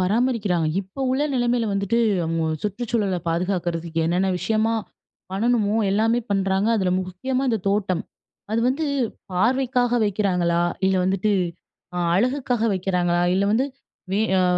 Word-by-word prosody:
பராமரிக்கிறாங்க. 205 -4 +1
இப்போ 195 +7 -10
உள்ள 265 +3 +1
நிலைமையில 240 -1 +1
வந்துட்டு 200 +3 0 0.3
அவுங்க 165 0 -1 0.2
சுற்றுச்சூழல 210 -2 -1
பாதுகாக்கிறதுக்கு 170 -1 -1
என்னென்ன 180 +3 +1
விஷயமா 220 +3 +1 0.6
பண்ணணுமோ! 215 +1 +1
எல்லாமே 225 +4 +2
பண்றாங்க. 195 +1 +1
அதில 190 -3 +1
முக்கியமா 220 +9 -3
இந்த 225 - +1
தோட்டம். 195 -4 0 0.5
அது 225 +1 +1
வந்து 295 +5 0 0.5
பார்வைக்காக 245 +4 +1
வைக்கிறாங்களா? 180 -4 +1 0.2
இல்ல 190 0 +2
வந்துட்டு 195 +3 +1 0.6
அ - - 0 0.2
அழகுக்காக 245 +2 +1
வைக்கிறாங்களா? 180 -2 0
இல்ல 195 - +2
வந்து, 230 +5 +2 0.5
வே 200 - +2 0.2
ஆ, 185 - +3
200 Hz, 125 wpm, -23 LUFS, 185-235 Hz, 0.6 s, ஆ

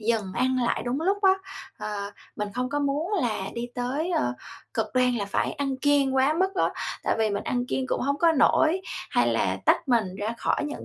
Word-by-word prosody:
dừng 215 -4 0
ăn 260 +3 +1
lại - - 0
đúng 250 +4 -1
lúc 390 +5 +1
á." 385 -1 +7 0.5
Ờ, 200 -1 -4 0.3
mình 210 0 -2
không 250 +1 -1
có 290 +2 -1
muốn 290 +7 -1
là 215 -5 -1
đi 240 0 -4
tới, 270 +8 -2
ờ, 120 - +1 0.4
cực 225 -1 0
đoan 250 -1 +3
là 200 - -1
phải 200 - -1
ăn 275 -1 -2
kiêng 280 -1 +2
quá 265 +3 +4
mức 380 +1 +1
á, - - +2 0.3
tại - - +1
vì 220 -1 +2
mình 200 - -2
ăn 245 0 -1
kiêng 260 +1 -1
cũng - - -1
hông 280 +2 0
có 335 -1 +5
nổi, 320 +4 +4 0.3
hay - - +3
là - - +1
tách 285 - +3
mình 235 -4 +4
ra 215 +3 -2
khỏi - - 0
những 295 0 -5
255 Hz, 220 wpm, -26 LUFS, 225-290 Hz, 0.5 s, á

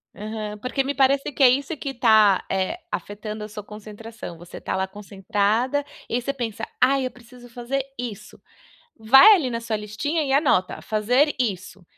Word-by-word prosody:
Aham. 210 0 -6
Porque 265 +3 -1
me 275 +2 -2
parece 275 +1 +2
que 280 - -6
é 255 - +9
isso 275 +5 0
que 275 -1 -5
tá, 220 -5 +4
eh, 190 - -1
afetando 210 +1 -5
a - - -6
sua 210 -1 -8
concentração. 210 -2 -10
Você 175 +1 -11
tá - - -3
lá, 190 0 -1
concentrada, 205 +7 -1 0.2
e - - -1
aí 245 - 0
você 275 +3 -3
pensa: 225 -4 -5
"Ai, 265 +1 +3
eu 255 - -3
preciso 245 +1 -16
fazer 245 +3 -3
isso", 215 -4 -8 0.6
vai 270 - +8
ali 300 -10 0
na 230 -1 -3
sua 230 -1 -2
listinha 210 +10 -2
e 270 - -1
anota: 270 - +2
"Fazer 245 +8 +1
isso" 195 -5 -3
230 Hz, 180 wpm, -23 LUFS, 210-270 Hz, 0.6 s, é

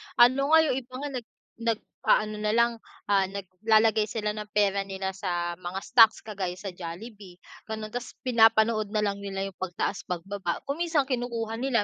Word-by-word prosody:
Ano 260 +4 +5
nga, 320 0 +7
'yong 300 - +1
iba 255 0 -17
nga 290 +1 -4
nag 230 - -19 0.3
nag-aano 215 -1 0
na 210 0 0
lang, 235 0 +4 0.4
ah, 195 -1 +4
naglalagay 210 +3 +2
sila 210 -1 -2
ng 210 0 -6
pera 200 -1 +2
nila 190 0 -3
sa 175 -2 -2
mga 185 +1 -4
stocks 225 -3 +5
kagaya 190 -4 -4
sa 195 0 -6
Jollibee, 180 +2 -9 0.3
gano'n 215 -1 -5
tapos 245 0 -5
pinapanood 225 -3 +4
nalang 210 -2 0
nila 195 -1 -4
'yong 195 -2 -7
pagtaas, 185 +1 -3
pagbaba. 180 0 -3
Kung 280 +3 -4
minsan 330 -4 +2
kinukuha 235 -4 -3
nila, 245 -4 +1
215 Hz, 165 wpm, -27 LUFS, 195-235 Hz, 0.4 s, nga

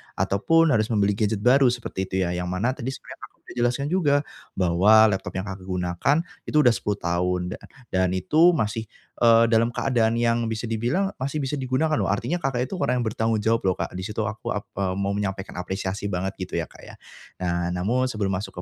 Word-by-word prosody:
ataupun 165 +11 +2
harus 110 -4 +2
membeli 105 -3 +2
gadget 105 0 -1
baru 130 +1 +5
seperti 120 -6 -2
itu 95 - -5
ya, 90 - -1
yang 90 - -3
mana 95 +8 0
tadi 130 -1 -6
sebenernya 135 - -7
sudah - - -10
Kakak - - -14
jelaskan 125 +4 0
juga 160 -6 +3 0.4
bahwa 100 +5 +5
laptop 95 -1 -4
yang 95 - -2
Kakak 95 -1 -8
gunakan 90 - 0 0.3
itu 150 - 0
udah 125 - +6
10 105 -2 -2
tahun. 90 0 0
Da - - -7 0.4
dan 95 -1 +2
itu 155 - +4
masih, 110 0 -1 0.4
eee, 115 0 +6
dalam 115 +1 +4
keadaan 115 -4 +1
yang 115 -1 +1
bisa 110 +1 -3
dibilang 120 - 0
masih 140 +3 -2
bisa 135 - -3
digunakan 130 +5 0
loh, - - +1
artinya 175 - 0
Kakak 130 -3 0
itu - - -7
orang 125 +1 +1
yang - - -2
bertanggung 110 0 0
jawab 115 +2 +1
loh 90 - -1
Kak. - - -4
Di 95 - -5
situ 105 +3 -3
aku 110 +1 -5
ak 105 - -3
eee, 95 -2 -1
mau 100 0 -1
menyampaikan 100 -1 -3
apresiasi 95 +2 -4
banget 95 +1 -2
gitu 90 - -4
ya, - - -1
Kak, - - -17
ya. - - -12 0.5
Nah. 85 -1 -1
Namun 115 +9 0
sebelum 100 -4 -1
masuk 95 -1 -5
110 Hz, 210 wpm, -24 LUFS, 95-125 Hz, 0.5 s, udah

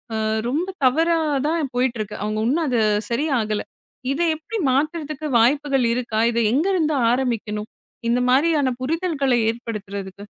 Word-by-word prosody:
அ - - 0 0.3
ரொம்ப 325 +8 -1 0.2
தவறா 325 +6 +3 0.3
தான் 320 -1 0
போயிட்டிருக்கு. 235 -5 -1
அவுங்க 215 0 -2
இன்னும் 320 +6 +1
அது 245 -3 +1 0.3
சரியாகல. 235 -5 0 0.5
இத 275 - -2 0.2
எப்பிடி 420 +9 -6
மாத்துறதுக்கு 305 +2 -1
வாய்ப்புகள் 270 +2 +2
இருக்கா? 235 -3 -2
இதை 235 - +1
எங்கேருந்து 315 +2 +1 0.2
ஆரம்பிக்கணும்? 225 -4 -2 0.4
இந்த 240 +1 +2
மாதிரியான 280 -1 +3
புரிதல்கள 310 -2 -1 0.2
ஏற்படுத்துறதுக்கு? 200 -4 -6
260 Hz, 120 wpm, -22 LUFS, 230-310 Hz, 0.5 s, தவறா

